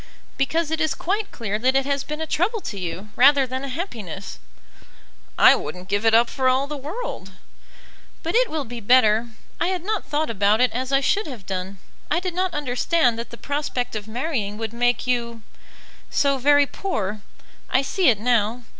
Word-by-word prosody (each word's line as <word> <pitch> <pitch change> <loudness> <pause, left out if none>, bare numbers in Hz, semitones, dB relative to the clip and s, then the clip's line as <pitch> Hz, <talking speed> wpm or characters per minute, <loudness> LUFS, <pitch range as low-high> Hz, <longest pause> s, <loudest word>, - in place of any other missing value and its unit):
"Because 315 +3 0
it 320 +1 -1
is 310 -4 +1
quite 400 +7 -2
clear 210 -3 -3
that 260 +3 +2
it 270 0 +3
has 280 -1 -1
been 300 0 -6
a - - -1
trouble 375 +9 0
to 200 - -6
you 180 +3 -5
rather 275 +2 +6
than 260 +1 -4
a - - -4
happiness." 225 - -6 1.0
"I - - +8
wouldn't 180 +1 -7
give 205 +3 +1
it 225 - +5
up 235 +1 +5
for 260 +1 +1
all 260 +2 +2
the 295 +1 -6
world." 290 - -6 0.9
"But 330 - -2
it - - +3
will 310 -3 -3
be 235 +1 -7
better. 225 0 +4 0.3
I 340 - +1
had 365 -2 -2
not 425 0 -1
thought 300 -2 -1
about 205 0 +2
it 250 -2 +3
as 255 +2 -3
I 275 0 +3
should 405 +8 +1
have 240 -9 -9
done. 190 +1 -4 0.3
I 315 - +2
did 365 -1 -4
not 370 +1 0
understand 255 -2 +1
that 235 - -5
the 235 - -10
prospect 280 -4 -3
of 215 0 -5
marrying 225 -4 -3
would 225 0 -4
make 245 +1 +1
you 235 -2 -2 0.7
so 275 -1 +1
very 285 +2 +5
poor. 215 - -3 0.5
I 260 - +2
see 350 +3 +2
it 220 -5 +2
now. 235 0 +1
255 Hz, 195 wpm, -23 LUFS, 225-300 Hz, 1.0 s, I